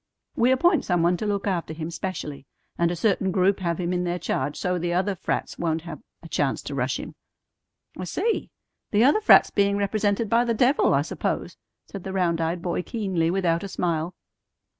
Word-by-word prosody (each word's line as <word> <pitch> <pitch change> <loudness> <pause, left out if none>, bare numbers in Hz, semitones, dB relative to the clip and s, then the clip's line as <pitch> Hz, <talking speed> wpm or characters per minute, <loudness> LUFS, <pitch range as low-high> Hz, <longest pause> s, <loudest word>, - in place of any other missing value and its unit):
We 240 - +3
appoint 300 +5 +3
some 175 -3 +1
one 175 +1 +3
to 215 - -3
look 200 -1 -1
after 175 -5 -2
him 160 +1 -5
specially, 155 -5 -5 0.3
and 170 0 +2
a 175 - -2
certain 190 +1 +1
group 190 +2 +2
have 170 -2 -2
him 175 0 -1
in 180 0 0
their 175 0 -1
charge 145 -4 -2
so 180 -1 -1
the 175 +1 -1
other 190 +3 +1
frats 180 - -3
won't 165 -1 -1
have 165 -4 -8 0.2
a - - -9
chance 145 -4 -1
to 145 - -6
rush 130 -1 -1
him - - -7 0.4
" - - -27
"I 185 - -3
see. 425 - -1 0.4
The 210 +2 +3
other 295 - +4
frats 430 - +6
being 200 0 +2
represented 205 +2 0
by 230 +3 +3
the 235 -1 0
devil, 255 +5 +3
I - - +2
suppose," - - -3 0.3
said 195 -3 -8
the 190 - -5
round 170 -3 +1
eyed 170 +1 -2
boy 175 0 -1
keenly 190 -6 -1
without 170 -2 +1
a - - -4
smile. 170 -2 -2
180 Hz, 205 wpm, -25 LUFS, 170-205 Hz, 0.4 s, frats